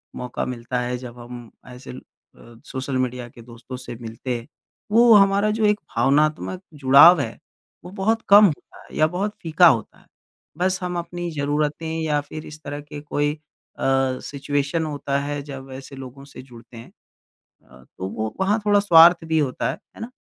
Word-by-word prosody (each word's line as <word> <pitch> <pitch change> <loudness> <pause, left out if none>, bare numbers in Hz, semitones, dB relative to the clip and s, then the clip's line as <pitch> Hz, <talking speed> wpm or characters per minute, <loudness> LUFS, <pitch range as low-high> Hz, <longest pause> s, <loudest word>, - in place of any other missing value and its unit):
मौक़ा 125 -1 -4
मिलता 125 0 -4
है 125 0 -3
जब 120 -1 -10
हम 120 -1 -10 0.2
ऐसे 125 0 -11
ल 125 - -9 0.4
अ, 120 - -16
सोशल 130 0 -4
मीडिया 125 -1 -2
के 120 - -15
दोस्तों 120 +2 -11
से 125 -2 -8
मिलते 120 +2 -5
हैं। 115 - -11 0.4
वो 230 +1 +6
हमारा 200 +1 +4
जो 220 0 0
एक 210 0 +2 0.2
भावनात्मक 155 +6 +1
जुड़ाव 145 +4 +7
है, 115 -3 -5 0.5
वो 180 - -10
बहुत 220 +3 0
कम 205 +1 +9
होता 155 -7 -3
है - - -15
या 155 - +4
बहुत 205 +2 -2
फ़ीका 165 +2 +5
होता 115 -8 0
है। - - -25 0.5
बस 185 +1 0
हम 180 -1 -3
अपनी 175 0 -5
ज़रूरतें 150 +2 -2
या 150 -2 0
फ़िर 155 +1 -9
इस 155 0 -11
तरह 145 0 -6
के 145 0 -10
कोई 145 0 -1 0.5
अ, 135 -1 +1
सिचुएशन 145 +3 -2
होता 140 -2 -2
है 145 0 -4
जब 135 -1 -8
ऐसे 135 +1 -10
लोगों 135 +1 -10
से 140 - -12
जुड़ते 120 -2 -15
हैं। 115 - -12 0.8
अ, 65 0 -17
तो 95 - -4
वो 110 +1 -4
वहाँ 205 +3 +1
थोड़ा 205 -1 +4
स्वार्थ 170 -3 +6
भी 160 0 +1
होता 135 -4 -1
है, - - -9 0.2
है - - -12
ना? 230 - -5
145 Hz, 185 wpm, -22 LUFS, 125-175 Hz, 0.8 s, कम